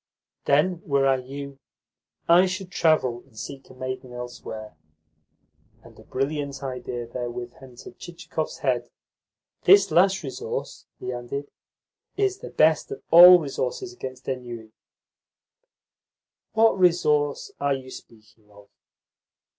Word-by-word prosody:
"Then, 165 +5 +2
were 140 -2 +1
I 135 -1 +3
you, 135 +2 -8 0.7
I 175 +3 +6
should 185 0 -5
travel, 155 -9 +2
and 115 -5 -23
seek 135 +3 -8
a 130 - -14
maiden 130 -1 -6
elsewhere." 120 -3 -8 1.1
And - - -17
a - - -14
brilliant 140 0 -3
idea 125 -2 -5
therewith 120 0 -6
entered 125 -2 -13
Chichikov's 170 -2 -5
head. 120 -2 0 0.8
"This 195 +2 +6
last 190 +1 +3
resource," 135 - -6
he 125 - -4
added, 125 +4 -6 0.7
"is 395 -1 0
the - - -8
best 155 0 +3
of - - -8
all 175 +2 +11
resources 150 - -4
against 130 - -9
ennui." 120 -4 -6 1.8
"What 225 -3 +3
resource 150 -5 +2
are 140 -1 +1
you 130 -1 -9
speaking 110 -2 -15
of?" 105 0 -18
135 Hz, 120 wpm, -25 LUFS, 125-170 Hz, 1.8 s, all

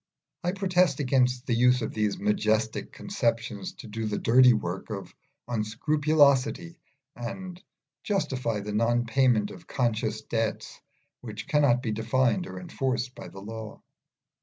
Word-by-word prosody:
I 175 +1 0
protest 180 -6 +2
against 125 -2 +2
the 125 - 0
use 125 +1 +4
of 110 - -4
these 105 -2 0
majestic 110 +2 0
conceptions 130 0 -2
to 135 - -11
do 110 +1 -4
the 105 - -2
dirty 125 +2 +6
work 95 -4 -2
of 100 -3 -6 0.3
unscrupulosity 145 +7 +2 0.4
and 180 +10 -7 0.4
justify 125 - -1
the 105 +1 -5
non 120 +2 +2
payment 115 -3 +2
of 165 - -12
conscious 110 -3 -1
debts 115 -1 -3 0.4
which - - -8
cannot 135 -4 +3
be 115 - -1
defined 120 - +1
or - - -7
enforced 130 -7 -2
by - - -9
the 95 - -11
law. 110 0 -7
120 Hz, 135 wpm, -27 LUFS, 110-145 Hz, 0.4 s, dirty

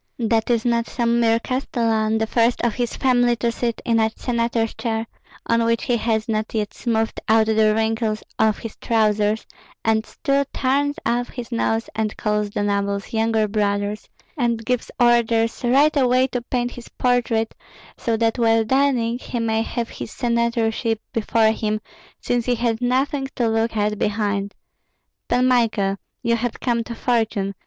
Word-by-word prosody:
That 225 -1 0
is 235 -1 +1
not 235 -1 +1
some 235 0 +1
mere 230 -1 +4
castellan, 230 -4 0
the 220 - +1
first 230 +2 +2
of 235 -2 +2
his 240 0 -2
family 245 -2 +3
to 235 0 0
sit 235 0 -3
in 230 -1 +2
a 220 0 +3
senator's 235 -2 -1
chair, 225 -1 -2 0.4
on 230 0 +2
which 230 0 +1
he 245 - +1
has 220 -1 0
not 220 0 -2
yet 210 -1 -1
smoothed 225 -2 -1
out 220 0 +5
the 215 -1 +3
wrinkles 220 -1 0 0.2
of 215 -2 +3
his 225 -3 -8
trousers, 215 -1 +1 0.4
and 220 -1 +2
still 275 +3 0
turns 285 +2 +1
up 245 +1 0
his 245 -1 -8
nose 225 -1 0
and 215 -1 -2
calls 210 -1 0
the 205 - -2
nobles 200 0 -1
younger 220 -1 +2
brothers, 205 0 -1 0.3
and 235 -5 -1
gives 250 0 -1
orders 235 -1 +3
right 275 +6 +4
away 255 -2 +3
to 245 - -2
paint 245 0 -2
his 240 -1 -11
portrait, 235 -3 0 0.4
so 230 -1 -1
that 225 +1 +1
while 225 -1 +4
dining 245 -1 +1
he 250 - -5
may 225 -1 +1
have 230 +1 -3
his - - -7
senatorship 235 -1 0
before 220 0 +2
him, 215 -1 -1 0.4
since 245 -1 -1
he 245 - +2
has 235 0 -1
nothing 270 +2 0
to 240 - +1
look 225 0 0
at 210 0 0
behind. 205 -1 -1 0.7
Pan 250 +1 +2
Michael, 220 -6 +2 0.3
you 235 -1 +2
have 235 0 -3
come 235 -2 0
to 235 - -6
fortune. 220 -5 0
230 Hz, 165 wpm, -22 LUFS, 220-240 Hz, 0.7 s, out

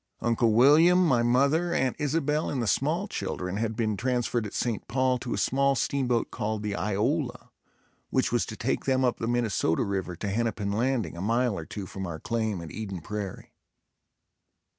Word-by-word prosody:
Uncle 115 -1 +2
William, 160 +9 +6
my 125 -7 +3
mother, 140 +8 +2
Aunt 130 -2 +1
Isabel 150 +1 0
and 135 - -2
the 120 - 0
small 155 - +1
children 90 - -4
had 110 0 -1
been 110 -2 0
transferred 120 -1 -1
at - - -11
St. 115 -4 -2
Paul 130 +2 +1
to 120 0 -3
a - - -4
small 140 +1 +2
steamboat 125 -4 0
called 110 -1 -3
the 105 -1 -2
"Iola," 120 - -1 0.6
which - - +1
was - - +1
to - - -7
take - - -1
them 130 -1 +2
up 125 - 0
the 115 - -2
Minnesota 115 -9 +1
river 95 -3 -3
to 100 +4 -4
Hennepin 105 -1 -1
Landing, 120 -1 0
a 85 - -6
mile 115 +2 +1
or 80 - -5
two 100 -2 -6
from 95 0 -6
our 80 -2 -5
claim 110 -2 -2
at 85 - -8
Eden 100 -5 -5
Prairie. 105 +1 -6
115 Hz, 185 wpm, -27 LUFS, 105-130 Hz, 0.6 s, William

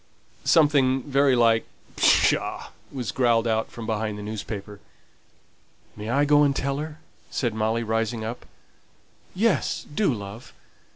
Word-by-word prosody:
Something 140 -5 +4
very 140 -2 +3
like 115 -2 +3 0.3
"Pshaw!" - - +2 0.2
was 125 -7 -4
growled 120 -3 +2
out 110 0 0
from 115 - -8
behind 110 -1 -2
the 105 - -7
newspaper. 105 -1 -6 1.2
"May 105 +1 -6
I 140 +4 +2
go 145 0 +5
and 140 -2 +3
tell 140 +1 -1
her?" 155 0 -6 0.3
said 120 -4 -1
Molly, 110 +2 0
rising 110 0 -1
up. 115 +2 -6 0.9
"Yes, 205 -3 0
do, 205 -1 +2
love. 105 0 -8
115 Hz, 130 wpm, -25 LUFS, 110-140 Hz, 1.2 s, go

